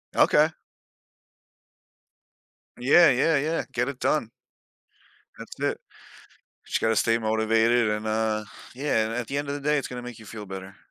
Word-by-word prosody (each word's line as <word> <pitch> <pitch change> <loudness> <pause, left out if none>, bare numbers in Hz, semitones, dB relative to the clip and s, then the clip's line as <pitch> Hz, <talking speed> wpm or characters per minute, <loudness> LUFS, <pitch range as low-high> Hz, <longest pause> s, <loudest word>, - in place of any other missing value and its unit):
Okay. - - +5 2.3
Yeah, 150 +6 +6
yeah, 140 +5 +3
yeah, 155 +4 -1
get 125 +2 -1
it 130 - -7
done. 150 -7 0 1.1
That's - - -11
it. - - -1 0.9
But - - -11
you - - +2
gotta 110 -1 +2
stay 115 0 +2
motivated, 110 +1 +2
and, 105 +1 -3
uh, 110 0 0 0.3
yeah, 125 -5 0
and 115 - -4
at 120 -2 -3
the 140 - -4
end 145 0 -4
of 140 - -2
the 145 - -5
day, 150 +1 +1
it's 135 - -4
gonna 125 -1 -7
make 125 -2 -9
you 110 - -13
feel 105 -1 -8
better. 95 0 -8
115 Hz, 165 wpm, -25 LUFS, 110-140 Hz, 2.3 s, Yeah